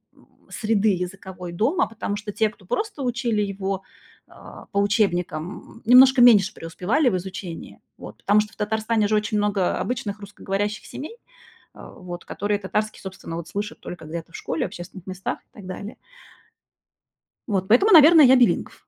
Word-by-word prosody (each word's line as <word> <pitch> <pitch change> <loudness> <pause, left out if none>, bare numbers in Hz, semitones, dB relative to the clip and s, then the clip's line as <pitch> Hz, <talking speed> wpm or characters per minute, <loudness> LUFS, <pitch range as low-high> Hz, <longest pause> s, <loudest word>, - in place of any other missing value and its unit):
м, - - -24 0.2
среды 215 -1 +1
языковой 180 0 -7
дома, 275 - +1
потому 220 -2 -4
что 210 0 -6
те, 220 +1 +1
кто 200 -3 -19
просто 410 - -3
учили 235 -3 0
его, 195 -1 -3 0.5
э, - - -18 0.4
по 200 - +2
учебникам, 180 -6 0 0.3
м, - - -17
немножко 255 +2 +7
меньше 215 -4 +6
преуспевали 190 - -1
в 190 - -1
изучении. 180 -2 -8 0.2
Вот. - - -11
Потому 210 +1 +3
что 210 +1 -7
в - - -18
Татарстане 220 0 0
же 215 - +1
очень 210 0 0
много, 205 -2 0
э, 180 - +1
обычных 210 -4 -3
русскоговорящих 205 +1 -4
семей, 315 - -8 0.6
э, - - -16 0.2
вот, 175 -1 -9
которые 205 0 -2
татарский, 210 +2 -2
собственно, 190 -3 -7
вот 170 -1 -7
слышат 205 +1 -5
только 175 -2 -9
где-то 165 +1 -7
в - - -10
школе, 160 - -2
в - - -3
общественных 180 +1 -10
местах 185 0 -4
и - - -40
так 200 - -12
далее. 200 +4 -7 1.5
Вот. 190 -2 -1
Поэтому, 380 - +5
наверно, 320 0 +9
я 260 0 +7
билингв. 245 -2 +2
205 Hz, 170 wpm, -23 LUFS, 190-225 Hz, 1.5 s, наверно